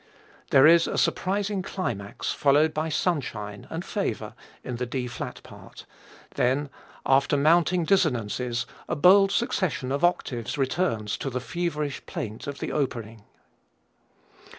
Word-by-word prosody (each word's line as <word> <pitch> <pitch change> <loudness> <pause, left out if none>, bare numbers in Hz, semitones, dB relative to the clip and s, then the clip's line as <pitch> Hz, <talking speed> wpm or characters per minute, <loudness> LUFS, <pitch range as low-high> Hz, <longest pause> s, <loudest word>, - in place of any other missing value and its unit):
There 135 - +6
is 170 +1 +6
a - - -3
surprising 200 +1 0
climax 120 - -4
followed 145 +2 +3
by 155 +1 -1
sunshine 115 - -2
and - - -5
favor - - -3 0.3
in 125 -2 -5
the 125 +1 -3
D 125 +1 -3
flat 120 -2 -6
part, - - -13 0.5
then 135 +3 0 0.3
after 140 +2 +3
mounting 170 +4 +3
dissonances 125 - 0 0.2
a - - 0
bold 195 +6 +6
succession 185 - -1
of 140 +3 -1
octaves 130 -7 0
returns 130 - -1
to 135 - -3
the 125 0 -3
feverish 150 -1 -3
plaint 110 +3 -6
of 140 -1 -5
the - - -4
opening. 115 -7 -3
140 Hz, 130 wpm, -26 LUFS, 125-170 Hz, 0.5 s, There